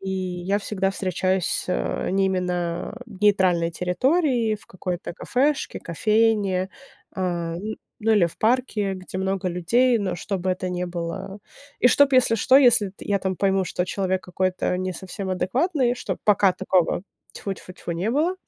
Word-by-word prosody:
и 190 Hz, 0 st, -5 dB
я 185 Hz, +1 st, -1 dB
всегда 195 Hz, -2 st, -1 dB
встречаюсь, 185 Hz, -1 st, 0 dB
э, -, -, -1 dB
не 195 Hz, 0 st, +2 dB
именно 180 Hz, 0 st, -2 dB
нейтральной 190 Hz, -5 st, +2 dB
территории, 235 Hz, -, +1 dB
в 210 Hz, -, -12 dB
какой-то 180 Hz, -2 st, -5 dB
кафешке, 270 Hz, -, -1 dB
кофейне, 205 Hz, 0 st, +1 dB, 0.5 s
а, 175 Hz, -3 st, -2 dB
н 215 Hz, +4 st, -5 dB, 0.2 s
ну, 225 Hz, +1 st, +1 dB
или 195 Hz, -5 st, +5 dB
в 165 Hz, -, -10 dB
парке, 220 Hz, -4 st, +1 dB
где 185 Hz, 0 st, -8 dB
много 190 Hz, -1 st, -1 dB
людей, 235 Hz, +8 st, +2 dB
но 190 Hz, -3 st, -2 dB
чтобы 185 Hz, +1 st, -2 dB
это 185 Hz, 0 st, -2 dB
не 180 Hz, 0 st, -2 dB
было 175 Hz, +3 st, -5 dB, 0.4 s
и -, -, +4 dB
чтоб, 280 Hz, +2 st, +4 dB
если 255 Hz, -3 st, +4 dB
что, 260 Hz, +4 st, +4 dB
если 240 Hz, -7 st, +5 dB
т 195 Hz, -, -13 dB
я 200 Hz, -1 st, +1 dB
там 190 Hz, 0 st, -2 dB
пойму, 195 Hz, 0 st, +2 dB
что 180 Hz, 0 st, -2 dB
человек 190 Hz, -1 st, -1 dB
какой-то 180 Hz, 0 st, -1 dB
не 185 Hz, 0 st, -2 dB
совсем 190 Hz, +2 st, -6 dB
адекватный, 245 Hz, -, +1 dB
что -, -, -4 dB
пока 200 Hz, -2 st, +4 dB
такого, 185 Hz, -1 st, +1 dB, 0.3 s
тьфу-тьфу-тьфу, 185 Hz, -3 st, -6 dB
не 180 Hz, +7 st, -1 dB
было. 320 Hz, +8 st, +1 dB
190 Hz, 155 wpm, -24 LUFS, 180-215 Hz, 0.5 s, или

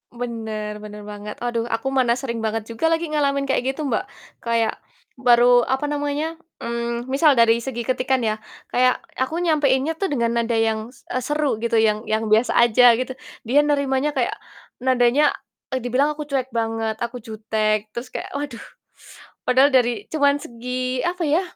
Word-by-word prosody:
Bener, 220 Hz, -3 st, -5 dB
bener 210 Hz, 0 st, -9 dB
banget, 210 Hz, 0 st, -7 dB
aduh 235 Hz, -1 st, -1 dB
aku 225 Hz, +3 st, -2 dB
mana 250 Hz, -3 st, +2 dB
sering 235 Hz, -3 st, -4 dB
banget 220 Hz, 0 st, -2 dB
juga 230 Hz, +8 st, 0 dB
lagi 330 Hz, -1 st, 0 dB
ngalamin 280 Hz, -2 st, +1 dB
kayak 270 Hz, -1 st, 0 dB
gitu 310 Hz, -, -5 dB
Mbak, 220 Hz, -, +1 dB, 0.4 s
kayak 230 Hz, -1 st, 0 dB, 0.5 s
baru 245 Hz, -1 st, +5 dB
apa 265 Hz, +2 st, 0 dB
namanya, 295 Hz, +3 st, -2 dB, 0.2 s
mmm, 235 Hz, +1 st, -3 dB
misal 285 Hz, +1 st, +4 dB
dari 230 Hz, 0 st, +5 dB
segi 240 Hz, -1 st, -4 dB
ketikan 255 Hz, 0 st, 0 dB
ya, 215 Hz, 0 st, 0 dB, 0.3 s
kayak 250 Hz, 0 st, +2 dB, 0.2 s
aku 260 Hz, +5 st, -1 dB
nyampaiinnya 300 Hz, -1 st, +1 dB
tuh 390 Hz, -, +1 dB
dengan 235 Hz, -5 st, 0 dB
nada 230 Hz, 0 st, 0 dB
yang, 225 Hz, -1 st, +1 dB, 0.2 s
s -, -, -22 dB
eee, 255 Hz, -, 0 dB
seru 295 Hz, -6 st, 0 dB
gitu 235 Hz, 0 st, -1 dB
yang 215 Hz, 0 st, +2 dB
yang 220 Hz, +1 st, 0 dB
biasa 225 Hz, +3 st, +3 dB
aja 240 Hz, 0 st, +6 dB
gitu 255 Hz, +2 st, -3 dB, 0.3 s
dia 255 Hz, +6 st, +3 dB
nerimanya 280 Hz, 0 st, +1 dB
kayak 250 Hz, -3 st, 0 dB, 0.4 s
nadanya 255 Hz, +2 st, +3 dB, 0.5 s
e -, -, +1 dB
dibilang 255 Hz, +4 st, +2 dB
aku 300 Hz, -, -5 dB
cuek 265 Hz, -2 st, 0 dB
banget 225 Hz, -1 st, -1 dB
aku 235 Hz, +1 st, -4 dB
jutek 215 Hz, -1 st, -1 dB
terus 240 Hz, +2 st, -6 dB
kayak -, -, -5 dB
waduh, 280 Hz, -4 st, -5 dB, 0.8 s
padahal 265 Hz, +3 st, +5 dB
dari 240 Hz, -2 st, +2 dB
cuman 285 Hz, -2 st, +3 dB
segi 250 Hz, +2 st, -3 dB
apa 350 Hz, 0 st, -1 dB
ya 315 Hz, +6 st, +3 dB
245 Hz, 165 wpm, -22 LUFS, 225-275 Hz, 0.8 s, aja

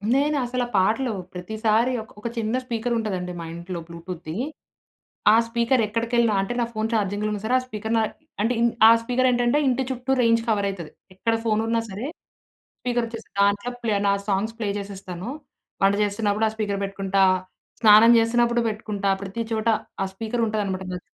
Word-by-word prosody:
నేను 290 Hz, +2 st, +2 dB
అసల 250 Hz, +1 st, -1 dB
ఆ -, -, -14 dB
పాటలు 225 Hz, +7 st, +2 dB, 0.2 s
ప్రతిసారి 220 Hz, +6 st, 0 dB
ఒక 220 Hz, -, -13 dB
ఒక 215 Hz, -, -4 dB
చిన్న 225 Hz, +1 st, 0 dB
స్పీకరుంటుందండి 225 Hz, -6 st, -2 dB
మా 165 Hz, -, -5 dB
ఇంట్లో 170 Hz, +1 st, -6 dB
బ్లూటూత్‌ద్ది. 170 Hz, -1 st, -7 dB, 1.0 s
ఆ -, -, +7 dB
స్పీకర్ 235 Hz, +2 st, +2 dB
ఎక్కడికెళ్ళినా 230 Hz, 0 st, +1 dB
అంటే 195 Hz, +5 st, -3 dB
నా -, -, +2 dB
ఫోన్ 220 Hz, +1 st, -2 dB
ఛార్జింగ్‌లో 210 Hz, 0 st, 0 dB
ఉన్న 210 Hz, -1 st, -3 dB
సరే 245 Hz, +3 st, +2 dB
ఆ -, -, -5 dB
స్పీకర్ 220 Hz, -1 st, -3 dB
న 225 Hz, -, +3 dB, 0.4 s
అంటే 230 Hz, +4 st, +2 dB
ఇన్ 235 Hz, -, +4 dB, 0.2 s
ఆ -, -, +9 dB
స్పీకర్ 255 Hz, +2 st, +2 dB
ఏంటంటే 245 Hz, +4 st, +2 dB
ఇంటి 260 Hz, +1 st, +1 dB
చుట్టూ 255 Hz, +1 st, -3 dB
రేంజ్ 230 Hz, 0 st, +4 dB
కవరయితది. 200 Hz, -6 st, -1 dB, 0.2 s
ఎక్కడ 225 Hz, +4 st, 0 dB
ఫోన్ 215 Hz, -1 st, +2 dB
ఉన్నా 230 Hz, 0 st, +1 dB
సరే! 205 Hz, +5 st, -5 dB, 0.8 s
స్పీకర్ 240 Hz, -1 st, 0 dB
వచ్చే 230 Hz, 0 st, -7 dB, 0.2 s
దాంట్లో 200 Hz, +4 st, +2 dB
ప్లే 220 Hz, -3 st, +1 dB
నా 200 Hz, -, +4 dB
సాంగ్స్ 205 Hz, +3 st, 0 dB
ప్లే 210 Hz, -3 st, -1 dB
చేసేస్తాను. 195 Hz, 0 st, -7 dB, 0.5 s
వంట 195 Hz, +1 st, +5 dB
చేస్తున్నప్పుడు 210 Hz, +1 st, +1 dB
ఆ -, -, -7 dB
స్పీకర్ 205 Hz, -2 st, -2 dB
పెట్టుకుంటా. 195 Hz, 0 st, 0 dB, 0.6 s
స్నానం 220 Hz, +2 st, +8 dB
చేస్తున్నప్పుడు 235 Hz, +1 st, +2 dB
పెట్టుకుంటా. 210 Hz, -2 st, -3 dB
ప్రతి 200 Hz, +4 st, -4 dB
చోటా 225 Hz, +1 st, +2 dB, 0.3 s
ఆ -, -, 0 dB
స్పీకర్ 225 Hz, +3 st, -2 dB
ఉంటుందనమాట 200 Hz, -3 st, -2 dB
నాత్ 180 Hz, -, -4 dB
220 Hz, 165 wpm, -24 LUFS, 200-235 Hz, 1.0 s, ఆ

